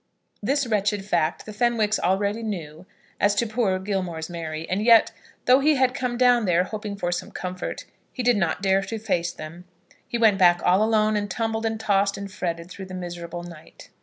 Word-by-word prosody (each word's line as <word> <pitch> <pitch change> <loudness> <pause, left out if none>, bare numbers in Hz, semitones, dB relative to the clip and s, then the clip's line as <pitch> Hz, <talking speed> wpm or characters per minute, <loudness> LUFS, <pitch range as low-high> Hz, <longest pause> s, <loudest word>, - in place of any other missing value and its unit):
This 275 +6 +1
wretched 210 -3 0
fact 170 -6 0
the 215 - -8
Fenwicks 220 -1 +1
already 200 +4 0
knew 180 -6 -6 0.3
as 205 0 +3
to 235 - +1
poor 215 -4 0
Gilmore's 185 -4 -3
Mary; 160 -1 -5
and 190 +3 -1
yet, 230 -1 +6 0.3
though 255 +2 +6
he 300 +2 +3
had 260 -1 +2
come 245 -1 -2
down 245 -2 +4
there, 180 -1 +3
hoping 210 +1 -5
for 175 -3 -2
some 175 - -3
comfort, 185 0 -5 0.3
he 255 - -4
did 245 0 +4
not 185 -1 -1
dare 195 0 +3
to 225 +3 -5
face 180 -6 -1
them. 165 +3 -10 0.4
He 235 - -2
went 220 -4 +4
back 175 -1 +5
all 185 +3 +4
alone, 215 -1 +2
and 205 -1 -1
tumbled 225 +1 -1
and 220 0 -3
tossed 200 -2 +1
and 200 0 -7
fretted 170 -1 -4
through 190 - -8
the 185 - -8
miserable 175 -1 -6
night. 170 -3 -13
200 Hz, 195 wpm, -24 LUFS, 175-220 Hz, 0.4 s, yet